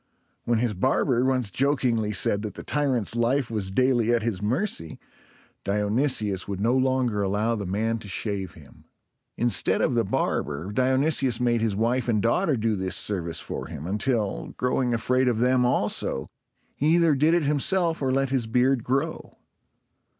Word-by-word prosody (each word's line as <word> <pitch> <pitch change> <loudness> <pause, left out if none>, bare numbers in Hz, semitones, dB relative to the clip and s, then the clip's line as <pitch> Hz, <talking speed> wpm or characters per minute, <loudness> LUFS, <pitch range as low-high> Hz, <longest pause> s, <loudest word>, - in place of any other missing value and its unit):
When 120 -1 +1
his 115 -1 0
barber 125 +4 +1
once 130 -5 +1
jokingly 125 -6 0
said 100 0 0
that 105 -1 -6
the - - -8
tyrant's 130 -7 0
life 120 +2 0
was 105 -4 -1
daily 120 +1 +2
at 120 -2 +1
his 110 -5 -2
mercy, 110 - -2 0.7
Dionysius 105 -1 0
would 100 -2 -4
no 115 +5 +1
longer 130 -5 +1
allow 105 +4 0
the 105 -4 -4
man 110 +4 -1
to 105 - -10
shave 95 -2 -3
him. 75 -4 -17 0.5
Instead 120 -5 +1
of - - +1
the - - +2
barber, 75 +7 -2
Dionysius 130 +1 +2
made 120 -2 +1
his 110 -3 0
wife 120 +4 0
and 110 -3 +1
daughter 140 - +1
do 110 -1 0
this 95 -1 -1
service 85 -5 0
for - - -6
him, 75 -2 -8
until, 105 +2 -2
growing 125 0 0
afraid 125 +3 +1
of 120 -3 +1
them 125 +1 +2
also, 95 - 0 0.5
he 155 +4 +2
either 170 -3 +4
did 155 +5 +3
it 175 - +1
himself 165 +4 +1
or 130 -1 0
let 135 0 +1
his 130 -4 0
beard 125 +1 +2
grow. 140 +6 -2
120 Hz, 165 wpm, -25 LUFS, 105-130 Hz, 0.7 s, either